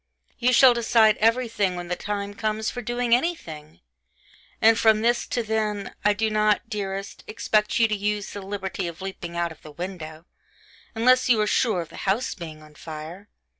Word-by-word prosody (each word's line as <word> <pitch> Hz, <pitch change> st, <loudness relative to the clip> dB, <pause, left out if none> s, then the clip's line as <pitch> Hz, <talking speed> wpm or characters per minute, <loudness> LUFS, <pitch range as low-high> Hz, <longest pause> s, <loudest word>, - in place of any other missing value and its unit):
You 250 Hz, +1 st, +3 dB
shall 255 Hz, 0 st, +7 dB
decide 225 Hz, -2 st, +4 dB
everything 225 Hz, -4 st, +1 dB
when 175 Hz, 0 st, -6 dB
the 180 Hz, -, -1 dB
time 200 Hz, +1 st, -4 dB
comes 215 Hz, 0 st, -2 dB
for 245 Hz, -, -5 dB
doing 240 Hz, +1 st, 0 dB
anything... 170 Hz, -, -2 dB, 0.8 s
and 225 Hz, 0 st, +5 dB
from 220 Hz, -1 st, +4 dB
this 240 Hz, +1 st, +1 dB
to 240 Hz, -, -1 dB
then, 215 Hz, -2 st, -2 dB
I 210 Hz, -, +4 dB
do 220 Hz, +1 st, -1 dB
not, 215 Hz, 0 st, +2 dB
dearest, 195 Hz, -3 st, -5 dB
expect 215 Hz, -1 st, 0 dB
you 230 Hz, -, +4 dB
to 215 Hz, -, -1 dB
use 205 Hz, 0 st, -2 dB
'the 205 Hz, -, -7 dB
liberty 195 Hz, -1 st, -4 dB
of 170 Hz, +2 st, -8 dB
leaping 175 Hz, -3 st, -6 dB
out 170 Hz, -1 st, -1 dB
of 160 Hz, -, -14 dB
the 155 Hz, -, -12 dB
window,' 165 Hz, -1 st, -7 dB, 0.7 s
unless 255 Hz, +3 st, +4 dB
you 230 Hz, -3 st, +5 dB
are 210 Hz, -, +3 dB
sure 210 Hz, -3 st, +1 dB
of 165 Hz, -, -9 dB
the -, -, -12 dB
house 210 Hz, +7 st, -1 dB
being 155 Hz, -4 st, -9 dB
on 155 Hz, 0 st, -16 dB
fire! 160 Hz, +6 st, -9 dB
210 Hz, 185 wpm, -24 LUFS, 180-225 Hz, 0.8 s, shall